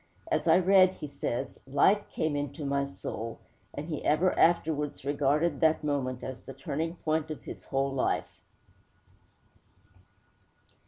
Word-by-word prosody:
_' - - -35 0.3
'As 260 - +1
I 160 +1 +7
read,' 185 0 +5
he - - -7
says, 130 -2 -4
'light 195 +9 +3
came 155 -2 -1
into 145 +1 -3
my 140 0 0
soul,' 115 -4 -6 0.3
and 145 +2 -6
he 155 -4 -4
ever 175 +5 +3
afterwards 150 -4 +2
regarded 145 +2 +1
that 160 -1 +3
moment 130 -4 -1
as 130 -1 -5
the 135 - -10
turning 155 +5 -3
point 155 -2 -1
of 155 - -6
his - - -9
whole 135 0 0
life. 130 - -1
145 Hz, 145 wpm, -29 LUFS, 140-160 Hz, 0.3 s, I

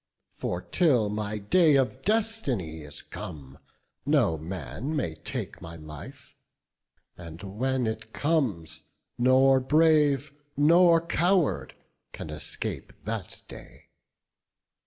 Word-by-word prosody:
For 90 0 -3
till 130 - +2
my 105 0 -3
day 150 - +4
of 130 -6 +1
destiny 170 - -1
is 75 0 -8
come, 70 -4 -9 0.4
No 135 - +3
man 85 - -5
may 85 - -1
take - - -6
my 85 0 -8
life; 75 -2 -11 0.8
and 85 0 -10
when 125 +6 -1
it 110 0 -4
comes, 115 - -1 0.4
Nor 130 +2 +5
brave 150 -1 +3 0.2
nor 170 +2 +5
coward 175 0 +1 0.4
can 80 - -7
escape 75 -2 -5
that 110 -3 -5
day. - - -13
120 Hz, 105 wpm, -27 LUFS, -, 0.8 s, Nor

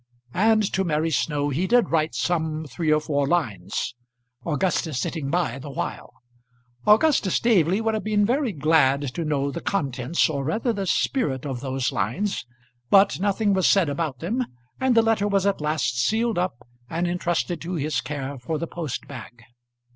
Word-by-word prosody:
And 215 +2 +3
to 190 - +1
Mary 160 -1 0
Snow 145 0 0
he 160 +7 -1
did 240 -3 +3
write 155 -6 +1
some 160 +3 -1
three 155 +3 -1
or 155 - +4
four 145 -2 -1
lines, 105 - -1 0.5
Augustus 160 -3 0
sitting 140 +1 -3
by 140 -6 0
the 140 - -8
while. 135 - -5 0.8
Augustus 215 - +4
Staveley 195 -4 +3
would 225 0 0
have 215 - -2
been 210 -1 +2
very 255 +2 +1
glad 145 -4 +2
to 170 - -3
know 140 -2 0
the - - -5
contents, 140 -5 0
or 140 -3 -2
rather 220 - 0
the 200 -2 -3
spirit 145 - 0
of 135 -4 -3
those 130 -2 -2
lines; 140 - -2 0.4
but 195 +2 +5
nothing 205 +1 +1
was 190 -1 +3
said 190 -6 +4
about 145 -2 -2
them, 220 - -1 0.4
and 260 -2 +2
the 230 - +6
letter 225 -2 +2
was 200 -1 +1
at 200 -5 +1
last 150 -5 0
sealed 225 - +1
up 125 -10 -3 0.2
and 170 +2 -1
intrusted 175 0 -1
to 175 +2 -4
his 155 0 -1
care 140 -2 -5
for 155 +6 -3
the 170 - -3
post 160 -5 -5
bag. 120 -3 -10
165 Hz, 175 wpm, -24 LUFS, 140-200 Hz, 0.8 s, the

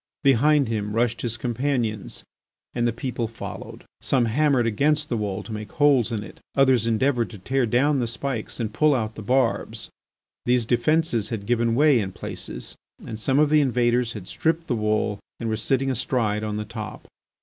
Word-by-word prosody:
Behind 140 +1 +4
him 105 -2 -2
rushed 115 -1 +1
his 120 -1 -2
companions, 120 -3 -2 0.5
and 120 -1 +1
the - - +2
people 120 -1 -3
followed. 115 - -8 0.2
Some 130 -3 +2
hammered 135 +1 +2
against 150 +7 +1
the 120 - 0
wall 105 -1 -3
to 115 - -10
make 105 -1 -6
holes 140 -6 +3
in 110 -2 -2
it; - - -12 0.2
others 130 -4 +4
endeavoured 120 +1 +1
to 110 - -10
tear 125 +6 0
down 135 +5 +2
the 120 - 0
spikes 120 0 -4
and 110 -3 -2
to - - -16
pull 150 -2 +5
out 110 -3 -2
the - - -8
barbs. 125 +2 0 0.6
These 120 -1 +3
defences 120 0 +2
had 110 -4 -4
given 115 0 +1
way 145 -1 +5
in 95 -3 -3
places - - -7 0.3
and 110 - -6
some 130 +4 +1
of 150 0 +4
the 155 -1 +6
invaders 120 -2 +1
had 100 -4 -8
stripped 165 +1 0
the 135 - -1
wall 105 -1 0 0.2
and 115 - -2
were 110 - 0
sitting 135 +4 0
astride 115 -4 0
on 105 -1 -2
the 105 - -3
top. 110 -3 -7
120 Hz, 190 wpm, -24 LUFS, 110-135 Hz, 0.6 s, the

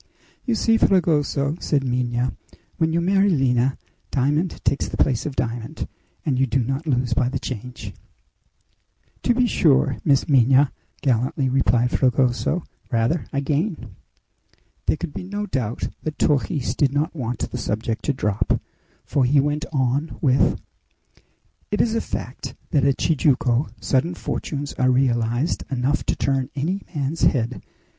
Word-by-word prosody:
"You 240 -3 +1
see, 225 +1 +3
Fragoso," 155 -6 +2
said 145 -3 0
Minha, 125 -1 -1 0.4
"when 160 -1 +1
you 165 - +1
marry 195 +3 +3
Lina, 130 -5 +2 0.3
diamond 150 +6 0
takes 140 - +1
the - - -5
place 130 -2 +1
of 140 - -5
diamond, 120 +4 -3 0.4
and 135 -5 +1
you 135 - +3
do 125 +1 +1
not 135 +6 -3
lose 125 -3 +1
by 125 +1 +1
the - - -2
change!" 125 0 -6 1.3
"To 240 - +2
be 250 0 +3
sure, 150 - +3
Miss 140 -3 +3
Minha," 135 0 +5 0.3
gallantly 130 +1 +1
replied 125 -2 +2
Fragoso; 130 +6 +1 0.3
"rather 120 +8 +1
I 140 - -1
gain!" 145 - -2 0.9
There - - +2
could 170 -3 -5
be - - -5
no 205 +3 -4
doubt 125 - -2
that 155 -1 -4
Torres 145 -1 +1
did 140 -3 +2
not 150 +4 -1
want 120 -5 -3
the - - -3
subject 110 +1 -2
to 145 - +2
drop, 105 -5 0 0.5
for 140 - +1
he 140 +3 +4
went 145 +2 0
on 135 +2 0
with: 135 -3 +3 1.1
"It 210 - -1
is 225 - +2
a 230 - +1
fact - - -6 0.2
that 145 -6 +3
at 140 -2 +2
Tijuco 135 -4 +2
sudden 155 +7 0
fortunes 145 -1 -4
are 130 0 +4
realized 125 +2 +1
enough 135 +2 0
to - - +1
turn 135 -2 0
any 175 +8 -1
man's 145 +3 -2
head! 125 -2 +1
135 Hz, 150 wpm, -23 LUFS, 125-155 Hz, 1.3 s, Minha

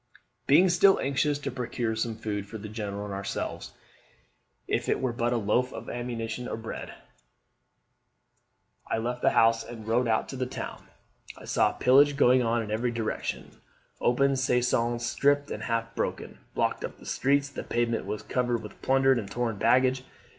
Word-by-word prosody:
"Being 175 +7 +6
still 185 +3 +5
anxious 140 +2 +1
to 145 - -4
procure 120 -2 -2
some 110 0 -2
food 105 -2 -4
for 110 - -7
the 105 0 -8
General 105 -2 -5
and 100 - -6
ourselves, 100 0 -4 0.9
if - - -1
it - - +1
were 130 -2 -1
but 120 0 0
a 120 - +1
loaf 115 +4 +1
of - - -7
ammunition 120 0 -4
bread, 115 - -7 1.9
I - - 0
left 120 +2 -3
the - - +4
house 115 0 +4
and 110 -2 -10
rode 120 +2 +2
out 110 -1 +3
into 135 - -8
the 130 0 -1
town. - - -7 0.5
I - - -12
saw - - +2
pillage 140 +3 +4
going 125 -1 +5
on 115 -1 +1
in 105 - -7
every 115 +3 0
direction: 115 -2 -3 0.5
open 140 +3 +3
caissons, 120 -2 +1
stripped 145 +3 +1
and - - -4
half 115 -1 -2
broken, - - -4 0.2
blocked - - 0
up - - -6
the - - -15
streets. 140 +2 +1
The 145 - -6
pavement 120 -1 -1
was 105 - -4
covered 120 -2 -1
with 105 - -11
plundered 135 -1 +3
and 100 -3 -6
torn 120 -2 -2
baggage. 130 +4 +3
120 Hz, 170 wpm, -28 LUFS, 115-130 Hz, 1.9 s, Being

